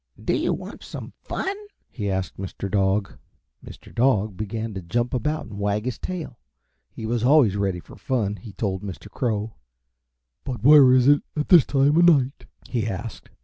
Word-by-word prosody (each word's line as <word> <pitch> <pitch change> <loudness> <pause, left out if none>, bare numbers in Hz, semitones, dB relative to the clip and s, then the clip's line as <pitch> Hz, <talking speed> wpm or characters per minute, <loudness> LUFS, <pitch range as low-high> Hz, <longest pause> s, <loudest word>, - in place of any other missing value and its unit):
"Do - - 0
you - - 0
want - - -6
some - - -8
fun?" 390 +1 -3 0.4
he 105 -4 -3
asked 95 -1 -3
Mr. 95 0 -5
Dog. 100 0 0 0.4
Mr. - - -13
Dog 110 -5 +2
began 110 +2 -4
to 95 - -5
jump 120 +8 -2
about 150 +5 -1
and 105 -1 -9
wag 105 +2 -1
his 125 - -3
tail. 170 -9 -6 0.5
He 110 - -8
was 115 0 -1
always 130 -6 +5
ready 95 -3 -1
for - - -14
fun, 105 -6 -2
he 110 -1 -11
told 95 -3 -2
Mr. 100 -3 -8
Crow. 110 -3 -2 0.9
"But 130 -4 -5
where 140 -2 +8
is 130 0 +5
it 145 0 +5 0.2
at 150 - -2
this 175 -8 +7
time 140 +2 +3
of 175 - +6
night?" 140 -5 +3 0.2
he 115 -3 -2
asked. 105 +2 -6
115 Hz, 180 wpm, -24 LUFS, 100-135 Hz, 0.9 s, where